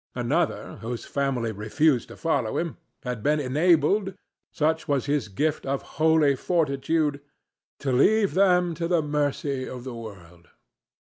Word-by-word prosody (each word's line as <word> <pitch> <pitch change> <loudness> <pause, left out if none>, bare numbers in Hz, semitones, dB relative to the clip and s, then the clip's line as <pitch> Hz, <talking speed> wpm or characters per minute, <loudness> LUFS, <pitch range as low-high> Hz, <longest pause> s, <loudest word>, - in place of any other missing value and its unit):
Another, - - -1
whose 115 +1 -5
family 130 -5 -1
refused 120 +6 +1
to - - -12
follow 140 -9 0
him, 170 -2 -3 0.3
had 125 -3 -4
been 150 +5 +2
enabled—such 160 +2 0
was 140 -4 0
his 145 -5 0
gift 145 +10 -1
of 135 0 -2 0.2
holy 160 -3 +4
fortitude—to 145 -2 -2
leave 200 - +3
them 180 -2 +3
to 165 +1 -3
the 170 -2 +2
mercy 145 -2 -1
of 125 -1 -7
the 130 -1 -6
world. 90 -7 -11
145 Hz, 130 wpm, -25 LUFS, 125-160 Hz, 0.3 s, holy